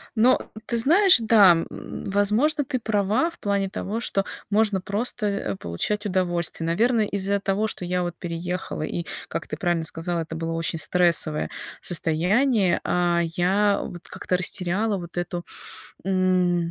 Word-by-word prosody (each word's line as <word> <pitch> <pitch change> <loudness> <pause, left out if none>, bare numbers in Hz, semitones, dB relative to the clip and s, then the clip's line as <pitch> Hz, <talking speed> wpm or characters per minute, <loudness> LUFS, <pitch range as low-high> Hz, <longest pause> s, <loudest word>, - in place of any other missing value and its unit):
Но 240 +3 +2
ты 235 - -1
знаешь, 350 - +6
да, 220 -4 +6
м, 165 0 -1 0.4
возможно, 215 +10 +2
ты 255 - -2
права 215 - +1
в 340 - -16
плане 200 -1 -1
того, 205 +3 -4
что 200 -4 0 0.2
можно 210 -2 +2
просто, 215 +3 -2
э, 200 - -2
получать 205 - -2
удовольствие. 175 -4 -1
Наверно, 225 +7 +2
из-за 200 -1 0
того, 200 +2 0
что 185 - -5
я 180 0 -1
вот 175 -1 -4
переехала 175 -1 -4
и, 170 +2 -4 0.2
как - - -5
ты 150 - -5
правильно 175 -1 -1
сказала, 165 +1 -3
это 160 0 -6
было 165 0 -3
очень 165 0 -1
стрессовое 170 -3 +2 0.3
состояние. 185 - +2
А, 175 -1 +1
я 190 +5 +1
вот 175 -1 -9
как-то 180 - -2
растеряла 190 +3 0
вот 175 -1 -9
эту, 175 0 -3 0.6
м, 180 -2 +1
185 Hz, 150 wpm, -24 LUFS, 175-210 Hz, 0.6 s, знаешь